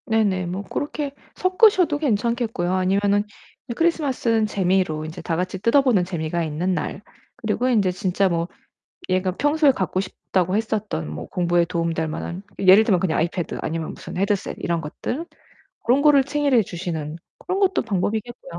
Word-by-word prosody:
네네. 205 -5 +1
뭐 185 +3 -4
고렇게 285 +5 -4 0.2
섞으셔도 370 -4 +4
괜찮겠고요 230 - 0
아니면은 200 +2 +2 0.5
크리스마스는 265 -9 +1
재미로 185 -6 0
인제 160 +3 -7
다같이 180 +3 -2
뜯어보는 230 -2 +3
재미가 170 -1 -2
있는 165 +4 -1
날 185 - -3 0.3
그리고 225 +3 -1
인제 205 -7 +3
진짜 185 +1 0
뭐 170 -2 -1 0.6
얘가 185 0 +1
평소에 295 0 +3
갖고 185 -5 -1
싶다고 185 -1 -1
했었던 215 - -2
뭐 75 +2 -6
공부에 175 -1 +1
도움이 170 0 -1
될 160 0 -1
만한 170 +3 -5 0.2
예를 190 +2 +7
들면 200 -5 +3
그냥 175 -3 0
아이패드 170 +1 -2
아니면 160 0 -3
무슨 - - -9
헤드셋 195 +1 -1
이런 170 -1 -1
것들 245 - -5 0.6
고런 250 +4 +3
거를 285 -2 +6
생일에 285 -4 +2
주시는 165 -4 -5 0.2
그런 370 +1 -2
것도 385 -1 +2
방법이겠고요. 215 -1 -3
195 Hz, 375 characters per minute, -23 LUFS, 175-240 Hz, 0.6 s, 예를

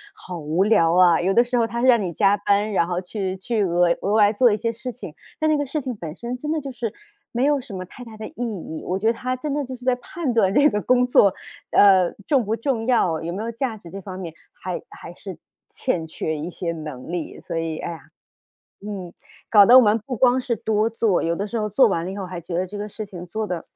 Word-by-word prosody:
好 180 -2 -8
无 160 +4 +1
聊 170 -6 +4
啊。 175 -2 +5
有 185 +2 +1
的 235 - +6
时 245 +1 -3
候 235 -2 +2
他 235 +1 -3
是 255 - +3
让 240 -3 +6
你 180 -3 -2
加 195 +4 +3
班， 205 +1 +1
然 170 -3 +2
后 175 0 -1
去 190 0 -4
去 215 +3 -1
额 175 -1 +3
额 200 - 0
外 210 -1 +5
做 240 +2 +4
一 210 - +1
些 230 +2 -1
事 240 +3 -6
情， 225 -10 -9 0.3
但 310 - +1
那 - - +4
个 290 - 0
事 305 +4 -2
情 255 -2 -4
本 165 -6 -7
身 240 +1 -5
真 300 +3 -3
的 320 - 0
就 275 -2 -6
是 240 -3 -4 0.4
没 245 +3 +1
有 290 -1 +2
什 230 - -11
么 185 -1 -5
太 245 +7 -12
大 225 -2 -11
的 215 - -6
意 - - -16
义。 190 -8 -5
我 185 - 0
觉 200 - -5
得 225 - +4
他 255 +2 -3
真 285 +3 -4
的 290 0 -1
就 260 -1 -6
是 250 0 -14
在 255 - +4
判 270 +2 -4
断 205 -5 +3
这 285 +8 +5
个 210 -8 0
工 250 +2 +3
作， 205 -5 +5 0.4
呃， 190 -3 +5
重 275 -5 +2
不 215 +1 -1
重 230 -1 -2
要。 185 -10 +2
有 165 +1 -4
没 195 +5 -4
有 230 - -3
价 235 -1 -3
值 175 -5 -13
这 195 - -7
方 185 -1 -8
面 170 -4 -6 0.2
还 180 -2 -5
还 170 - -11
是 185 -1 -9 0.3
欠 165 -2 -2
缺 160 0 -3
一 155 +4 -5
些 170 -1 -3
能 155 -3 -7
力。 175 -2 -5
所 - - -5
以， 165 -1 -2
哎 - - -4
呀， 165 - -8 0.9
嗯， 195 -4 -6 0.4
搞 205 -2 +8
得 245 +5 +9
我 260 - +8
们 210 0 +4
不 255 - -3
光 250 +2 +4
是 250 -2 -1
多 220 +1 0
做， 225 -4 +1
有 170 +1 0
的 200 - -3
时 230 +2 -3
候 210 0 -1
做 250 +5 +5
完 170 -5 -1
了 185 - -4
以 - - -6
后 195 - -4
还 180 -1 -6
觉 170 +1 -6
得 180 +2 0
这 200 +3 -8
个 205 +1 -4
事 215 +1 -6
情 180 -3 -9
做 215 +5 -3
得 180 -3 -4
210 Hz, 290 characters per minute, -22 LUFS, 180-240 Hz, 0.9 s, 得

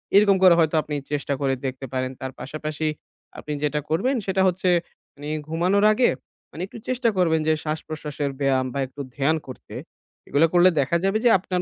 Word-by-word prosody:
এরকম 200 -1 +6
করে 185 -2 +8
হয়তো 160 -1 +2
আপনি 150 - -5 0.2
চেষ্টা 145 -1 -1
করে 135 -1 +1
দেখতে 130 0 -4
পারেন। 130 0 -1
তার 130 0 -4
পাশাপাশি 155 +2 -4 0.5
আপনি 150 - -5
যেটা 150 0 0
করবেন, 235 - +1
সেটা 190 0 +1
হচ্ছে 185 0 +1 0.5
মানি 145 +1 -7 0.2
ঘুমানোর 180 +6 +2
আগে 245 +3 +3 0.4
মানি 160 - -8
একটু 225 - -11
চেষ্টা 255 -2 +1
করবেন 165 -3 +3
যে 155 - +4
শ্বাস-প্রশ্বাসের 150 -2 -4
ব্যায়াম 135 -2 +2
বা 140 - -2
একটু 135 +2 -9 0.2
ধ্যান 145 +3 +2
করতে। 130 - -11 0.5
এগুলা 155 +4 +3
করলে 175 +1 +6
দেখা 140 +5 +2
যাবে 195 +2 +2
যে - - +7
আপনার 180 0 -2
155 Hz, 180 wpm, -23 LUFS, 140-185 Hz, 0.5 s, করে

